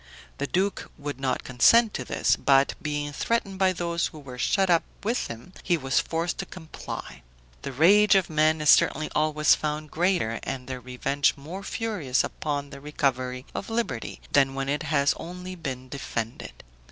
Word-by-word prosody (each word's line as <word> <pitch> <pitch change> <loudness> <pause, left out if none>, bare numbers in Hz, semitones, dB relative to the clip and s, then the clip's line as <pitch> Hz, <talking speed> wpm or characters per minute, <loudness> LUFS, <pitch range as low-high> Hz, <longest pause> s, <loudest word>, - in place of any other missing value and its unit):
The 140 - -1
duke 195 +5 -1
would 145 -2 -5
not 130 -2 -1
consent 215 - +5
to - - -3
this; - - +1
but 135 0 +3
being 145 -1 -3
threatened 195 +2 -1
by 190 -1 +4
those 170 -1 -1
who 155 - -12
were 130 -4 -10
shut 195 +6 +2
up 170 -2 +4 0.2
with 230 +4 0
him, 115 +11 -10
he 175 -2 +1
was 135 -2 +1
forced 165 +1 -2
to - - -4
comply. 160 - -8 0.4
The 140 - -5
rage 200 +10 +5
of 190 -2 +3
men 155 0 +2
is 150 - +6
certainly 155 +2 +3
always 155 0 +3
found 150 0 -3
greater, 170 -10 +1
and 125 -2 -5
their 130 -1 -5
revenge 135 +3 0
more 165 +8 -7
furious 195 - -1
upon 145 -2 -3
the 140 - -10
recovery 130 -3 -1
of 195 - -5
liberty, 225 - -3
than 135 -1 +3
when 135 0 -2
it 145 +2 0
has 140 -2 +3
only 180 +2 -7
been 130 -7 -6
defended. 115 -4 -5
150 Hz, 175 wpm, -26 LUFS, 135-180 Hz, 0.4 s, is